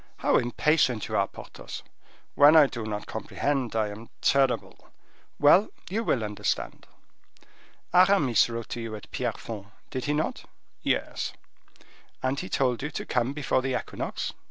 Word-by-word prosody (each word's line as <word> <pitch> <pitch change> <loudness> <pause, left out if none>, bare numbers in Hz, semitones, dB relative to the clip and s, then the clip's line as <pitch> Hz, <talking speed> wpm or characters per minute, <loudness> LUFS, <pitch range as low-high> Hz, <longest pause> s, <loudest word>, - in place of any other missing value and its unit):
how - - +2
impatient 125 -1 +2
you - - -3
are, - - +2
Porthos." - - -9 0.5
"When 145 +2 +7
I 155 -2 +9
do 120 -5 -5
not 105 -1 -4
comprehend, 135 -6 -2
I 110 -2 +1
am 110 +3 -10
terrible." 135 -1 +1 0.5
"Well, 165 +8 +6 0.2
you 225 +4 0
will 120 - +1
understand. 105 -1 -3 1.1
Aramis 180 - +5
wrote 115 -1 -5
to 120 - -4
you 115 -1 -5
at 105 - -11
Pierrefonds, 105 -3 -4 0.2
did 130 -2 -3
he 145 - +1
not?" 150 +1 -2 0.4
"Yes." - - -1 0.9
"And 130 +2 0
he 185 - -5
told 125 -3 +1
you 150 - -2
to - - -5
come 125 +2 0
before 135 -3 0
the 130 -1 0
equinox." - - -4
130 Hz, 150 wpm, -27 LUFS, 115-145 Hz, 1.1 s, I